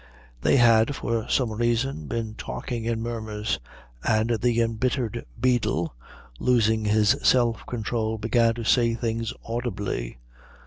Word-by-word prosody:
They - - +3
had 115 +2 +5
for 115 -3 -2
some 125 -4 +1
reason 120 - -1
been 110 +2 -3
talking 115 +1 -5
in 115 -1 -1
murmurs, 110 -2 -3 0.4
and 110 +1 +2
the 120 +1 +1
embittered 115 0 -1
beadle, 120 - +1 0.5
losing 110 -3 +2
his 105 +3 +4
self 120 -3 +3
control, 110 -1 -2
began 115 +1 +2
to 120 - -5
say 115 0 +3
things 115 -1 -2
audibly. 105 - -3
115 Hz, 125 wpm, -25 LUFS, 110-120 Hz, 0.5 s, had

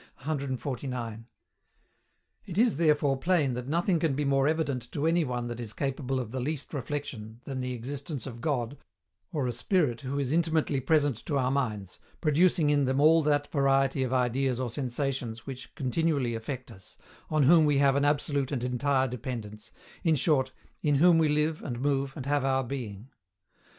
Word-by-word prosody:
149. 130 -4 -4 1.2
It 180 -2 -6
is 230 - +3
therefore 150 -4 +3
plain 155 -4 +2
that 125 +1 -5
nothing 170 +3 +1
can 155 -4 +1
be 145 +1 -1
more 135 0 +3
evident 145 -6 -1
to 145 - -1
any 165 +1 +3
one 125 -3 -3
that 120 0 -5
is 115 -3 -5
capable 135 -1 -2
of 120 -3 -5
the 130 - -3
least 145 +4 -3
reflexion 125 -5 -5
than 135 -2 -4
the 125 0 -3
existence 140 +2 -5
of 120 -3 -8
God, 135 -2 -2 0.5
or 145 -5 -1
a 125 - 0
Spirit 145 - 0
who 135 +1 -3
is 140 -2 -1
intimately 160 -3 +1
present 145 -2 +2
to 145 - 0
our 130 -1 +1
minds, 110 -9 -2 0.2
producing 160 0 +3
in 145 -1 +3
them 130 +1 +1
all 160 +3 +6
that 145 -1 +1
variety 135 -1 +2
of 130 -1 -1
ideas 130 0 +1
or 125 -3 -2
sensations 125 -3 -3
which 130 -2 -8
continually 140 -2 0
affect 125 +3 -5
us, 95 0 -16 0.3
on 155 -2 +2
whom 160 +3 +6
we 145 -2 +3
have 140 -1 +4
an 140 - +2
absolute 145 -1 +1
and 125 -4 -2
entire 130 +2 +1
dependence, 115 -4 -6 0.3
in 160 -2 +3
short 140 -1 +2 0.3
"in 145 -2 +2
whom 165 +3 +6
we 155 -2 +3
live, 150 +1 +1
and 120 -4 -5
move, 135 0 0
and 130 - -5
have 145 -1 +1
our 135 0 +1
being." 120 -3 -6
135 Hz, 180 wpm, -28 LUFS, 125-150 Hz, 1.2 s, all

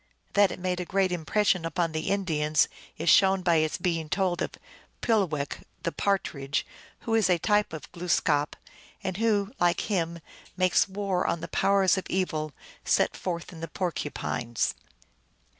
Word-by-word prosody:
That 200 -2 +5
it - - -5
made 180 0 -2
a - - -1
great 190 +1 +1
impression 180 +2 +1
upon 165 0 -1
the 155 0 -2
Indians 155 -7 +2 0.3
is 165 - -4
shown 190 +2 +5
by 170 -2 +4
its 155 0 +1
being 165 -4 -1
told 185 -1 0
of - - -2 0.5
Pulewech, 175 -11 0 0.2
the 170 - 0
Partridge, 145 -9 -1 0.4
who 225 - -2
is 220 -4 +3
a 180 - +4
type 210 +4 +2
of 155 -2 -8
Glooskap, 160 -4 +1 0.5
and 185 -1 -2
who, 210 -2 +1
like 175 -1 +3
him, 170 -5 -1 0.4
makes 185 +1 +3
war 195 -2 -1
on 170 - -1
the - - -4
powers 195 -1 +3
of - - -8
evil, 155 -5 -1 0.3
set - - +2
forth 175 -1 -4
in 165 - -10
the 165 - -4
Porcupines. 145 - -2
180 Hz, 160 wpm, -27 LUFS, 160-195 Hz, 0.5 s, That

